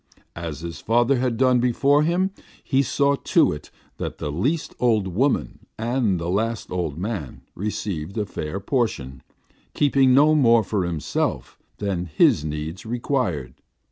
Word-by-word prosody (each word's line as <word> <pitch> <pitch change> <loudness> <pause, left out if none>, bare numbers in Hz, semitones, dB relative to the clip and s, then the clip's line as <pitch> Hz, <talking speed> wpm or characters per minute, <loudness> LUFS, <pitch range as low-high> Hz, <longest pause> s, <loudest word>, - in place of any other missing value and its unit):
As 80 -2 -6
his 85 0 -7
father 120 +4 +2
had 125 -2 0
done 130 0 +4
before 135 +4 +3
him, 175 +5 +1 0.3
he 135 -1 +2
saw 140 +2 +2
to - - +3
it 75 0 -7 0.3
that - - -5
the 75 - -4
least 135 - -1
old 110 -5 +2
woman 125 +10 -1
and 115 -5 0
the 85 - -4
last 110 +5 -1
old 85 -5 -2
man 95 - -4
received 100 -3 -4
a 105 - 0
fair 80 -1 -5
portion, 95 - -2 0.5
keeping 135 -2 +4
no 145 +4 +6
more 120 -6 +5
for 95 -2 -1
himself 85 -3 -2 0.2
than 95 -4 -2
his 75 -1 +3
needs 75 +3 -5
required. 115 - -2
110 Hz, 145 wpm, -23 LUFS, 85-130 Hz, 0.5 s, no